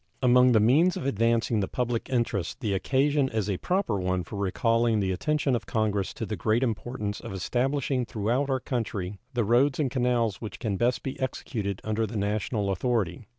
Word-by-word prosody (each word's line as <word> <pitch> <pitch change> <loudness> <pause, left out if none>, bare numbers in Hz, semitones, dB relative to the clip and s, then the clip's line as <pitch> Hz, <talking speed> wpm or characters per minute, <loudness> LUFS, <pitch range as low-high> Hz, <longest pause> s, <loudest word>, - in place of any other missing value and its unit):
Among 125 0 +6
the 110 - +5
means 150 +12 +4
of - - -5
advancing 115 -2 +1
the 95 - 0
public 120 +1 -2
interest 115 -4 -1
the 110 -7 -1
occasion 135 +7 +2
is 110 -4 -1
a 100 -3 -1
proper 180 - 0
one 90 0 -1
for 85 - -9
recalling 115 +3 +1
the 95 -2 0
attention 145 +7 0
of 120 - -4
Congress 105 -3 0
to - - -4
the - - -3
great 110 +4 +1
importance 115 -3 -3
of - - -8
establishing 125 +6 0
throughout 120 +5 -1
our 130 -1 +1
country 105 -7 -3 0.2
the 120 - +2
roads 125 +7 +3
and 140 -5 +1
canals 120 -5 0
which 105 -6 -6
can 110 -5 -2
best 120 +5 0
be 135 - -5
executed 105 -6 -3
under 110 +1 -1
the 110 +1 -5
national 105 0 -1
authority. 100 -1 -1
115 Hz, 190 wpm, -27 LUFS, 100-125 Hz, 0.2 s, Among